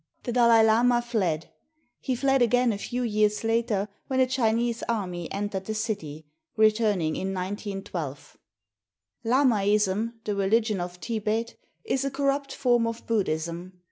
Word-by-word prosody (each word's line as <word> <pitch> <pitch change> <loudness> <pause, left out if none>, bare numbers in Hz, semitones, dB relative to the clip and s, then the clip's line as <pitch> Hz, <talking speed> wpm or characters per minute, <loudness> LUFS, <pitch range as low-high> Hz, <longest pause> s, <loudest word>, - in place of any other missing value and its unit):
The 245 - -3
Dalai 235 -2 +5
Lama 240 +2 +4
fled; 200 -10 -2 0.5
he 260 - -2
fled 270 +1 +2
again 245 0 +3
a 200 - -5
few 245 +4 -3
years 210 -2 +1
later 225 -3 0 0.2
when 260 -1 0
a 260 - +6
Chinese 235 -2 0
army 180 -7 -3
entered 200 -1 -3
the 220 - -3
city, 170 -9 -4 0.3
returning 215 -7 +2
in 190 0 -3
191 190 -5 -4
2. 145 - -22 0.9
Lamaism, 215 -4 +2
the 210 - -2
religion 210 0 +1
of 175 0 -5
Thibet, 220 +3 -2 0.3
is 270 -12 -1
a 275 - 0
corrupt 275 +1 -1
form 240 -3 +2
of 230 0 -5
Buddhism. 175 -4 -2
220 Hz, 140 wpm, -26 LUFS, 195-240 Hz, 0.9 s, a